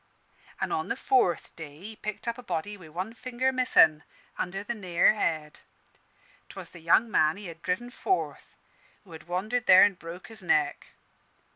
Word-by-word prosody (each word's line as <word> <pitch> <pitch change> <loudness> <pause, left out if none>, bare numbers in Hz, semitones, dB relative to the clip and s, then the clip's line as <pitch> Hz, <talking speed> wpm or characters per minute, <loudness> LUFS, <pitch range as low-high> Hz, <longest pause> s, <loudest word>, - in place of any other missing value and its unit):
An' - - -2
on - - -1
the - - -1
fourth 240 -11 +1
day 150 -2 -10
he 215 +4 -9
picked 215 +1 -6
up 235 +1 -2
a - - -7
body 190 -1 -4
wi' 180 -6 -13
one 185 +8 -5
finger 255 +2 -1
missin', 165 -12 +4 0.3
under 195 +2 -4
the 240 - -3
Nare 185 -6 +3
Head. 155 -7 -2 0.9
'Twas - - -10
the 175 - -12
young 195 +8 +3
man 155 -1 +3
he 205 - -9
had 170 -2 -9
driven 215 +8 -2
forth, 375 +8 -3 0.5
who 190 - -18
had 160 0 -11
wandered 215 +8 -2
there 185 0 +9
an' 205 - +4
broke 175 0 -10
his 220 -1 -10
neck. 150 -5 +1
185 Hz, 175 wpm, -28 LUFS, 165-225 Hz, 0.9 s, there